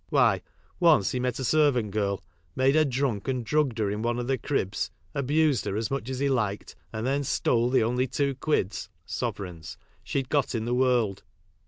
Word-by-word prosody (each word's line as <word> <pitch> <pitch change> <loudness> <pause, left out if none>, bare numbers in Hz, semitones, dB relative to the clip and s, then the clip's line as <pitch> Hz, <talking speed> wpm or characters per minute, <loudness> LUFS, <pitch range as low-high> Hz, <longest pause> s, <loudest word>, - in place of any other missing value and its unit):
Why, - - +3 0.4
once 160 - +5
he 125 - -1
met 125 -1 -1
a 135 - -3
servant 130 -6 +3
girl, 100 -1 -1 0.3
made 130 +1 +3
her 155 0 +4
drunk 130 -6 -1
and 130 -3 -1
drugged 140 -2 +1
her 105 -3 0
in 105 +1 -3
one 120 +1 0
of 120 - -2
the 130 0 0
cribs, 105 -9 -1 0.2
abused 145 -1 +2
her 100 - -2
as 115 +4 -2
much 135 -3 -2
as 130 - -3
he 140 +2 +1
liked, 110 -7 -1 0.2
and 110 0 -4
then 140 +2 +1
stole 120 -2 +1
the 130 -3 +3
only 125 +3 +1
two 140 +1 0
quids 130 -8 -1 0.2
(sovereigns) 90 -5 -5 0.3
she'd 135 -2 -2
got 140 -4 +1
in 110 -1 -1
the 120 - -1
world. 125 -6 +2
125 Hz, 195 wpm, -27 LUFS, 110-140 Hz, 0.4 s, once